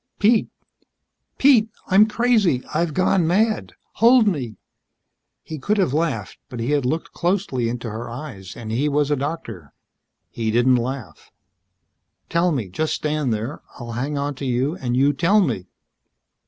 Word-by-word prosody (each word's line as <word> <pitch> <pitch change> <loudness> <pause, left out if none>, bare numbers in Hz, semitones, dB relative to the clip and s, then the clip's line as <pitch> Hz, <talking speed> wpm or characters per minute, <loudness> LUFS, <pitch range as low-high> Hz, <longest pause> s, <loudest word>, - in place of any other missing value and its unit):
"Pete 220 +2 +3 0.9
Pete. 245 -6 +5 0.2
I'm 200 +3 +6
crazy. 215 - +2
I've 160 0 0
gone 185 -2 +2
mad. 215 +5 +1 0.3
Hold 235 -1 +6
me." 130 - -2 0.9
He 155 -2 -7
could 210 +10 0
have 185 -10 +1
laughed, 150 -11 -2
but 125 - -7
he 115 +5 -1
had 145 -4 +1
looked 160 +5 -2
closely 175 - -1
into 120 0 -4
her 115 +2 -6
eyes 115 -7 -8
and 110 -2 -6
he 135 +6 +1
was 145 0 +1
a - - +3
doctor. 130 - -6 0.6
He 115 -1 -2
didn't 120 +3 +4
laugh. 125 -3 -5 1.0
"Tell 170 +1 +2
me. 125 -10 -2
Just 155 - -1
stand 150 -4 -1
here. 110 +7 -3 0.2
I'll 120 -1 -7
hang 135 +5 -3
onto 140 0 -3
you 130 +4 0
and 125 -6 -2
you 140 +2 +4
tell 170 +9 +3
me." 115 - -1
145 Hz, 155 wpm, -22 LUFS, 120-175 Hz, 1.0 s, I'm